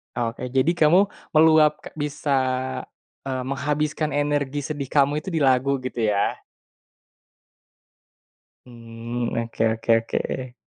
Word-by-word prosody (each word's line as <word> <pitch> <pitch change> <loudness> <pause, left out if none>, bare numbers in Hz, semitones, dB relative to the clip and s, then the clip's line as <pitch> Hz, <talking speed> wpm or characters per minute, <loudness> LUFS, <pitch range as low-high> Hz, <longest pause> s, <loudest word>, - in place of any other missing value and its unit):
Oke, 120 +1 -3
jadi 130 +3 +2
kamu 175 +5 +4 0.2
meluap 155 -1 +5 0.2
bisa 145 -1 -4 0.9
eee, 130 -1 -3
menghabiskan 150 +3 -1
energi 145 -1 0
sedih 140 -1 -5
kamu 145 +1 +2
itu 190 - -5
di 160 - 0
lagu 135 0 +2
gitu 125 -2 -4
ya? 100 0 0 2.3
Mmm, 115 0 -6
oke 115 -1 -1
oke 115 +1 -1
oke. 120 +2 -3
140 Hz, 105 wpm, -23 LUFS, 120-150 Hz, 2.3 s, meluap